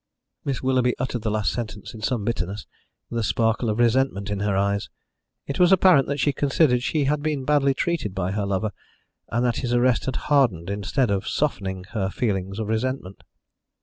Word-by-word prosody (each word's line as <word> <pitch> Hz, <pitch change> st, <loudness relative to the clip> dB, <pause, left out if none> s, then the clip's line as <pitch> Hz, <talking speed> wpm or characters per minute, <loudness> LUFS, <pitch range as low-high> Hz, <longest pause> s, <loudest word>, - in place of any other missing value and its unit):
Miss 135 Hz, -2 st, -3 dB
Willoughby 130 Hz, -1 st, +2 dB
uttered 125 Hz, -2 st, -2 dB
the 110 Hz, -, -1 dB
last 105 Hz, -1 st, 0 dB
sentence 110 Hz, -3 st, -6 dB
in 110 Hz, -, -10 dB
some 115 Hz, -3 st, -1 dB
bitterness, 105 Hz, -3 st, -3 dB, 0.5 s
with 115 Hz, -, -1 dB
a -, -, -1 dB
sparkle 115 Hz, +1 st, +1 dB
of 105 Hz, -, -1 dB
resentment 120 Hz, -4 st, +1 dB
in 100 Hz, -, -2 dB
her 100 Hz, -1 st, 0 dB
eyes. 100 Hz, 0 st, 0 dB, 0.6 s
It 140 Hz, -, -4 dB
was 180 Hz, 0 st, +5 dB
apparent 185 Hz, -7 st, +6 dB
that 140 Hz, +1 st, -2 dB
she 145 Hz, +2 st, +2 dB
considered 135 Hz, -2 st, +2 dB
she 150 Hz, +3 st, 0 dB
had 145 Hz, +2 st, +1 dB
been 145 Hz, -3 st, -2 dB
badly 140 Hz, -2 st, +3 dB
treated 135 Hz, -, -1 dB
by 95 Hz, 0 st, -1 dB
her 100 Hz, 0 st, -1 dB
lover, 100 Hz, +2 st, -1 dB, 0.6 s
and 120 Hz, +2 st, 0 dB
that 120 Hz, -, +1 dB
his 120 Hz, -2 st, -1 dB
arrest 120 Hz, 0 st, +2 dB
had 130 Hz, -, -2 dB
hardened, 115 Hz, -, +1 dB
instead 105 Hz, +4 st, 0 dB
of 100 Hz, 0 st, -1 dB
softening, 95 Hz, -11 st, -1 dB
her 95 Hz, -4 st, -1 dB
feelings 95 Hz, -3 st, -2 dB
of 110 Hz, -, -2 dB
resentment. 110 Hz, -3 st, -3 dB
120 Hz, 190 wpm, -24 LUFS, 100-135 Hz, 0.6 s, apparent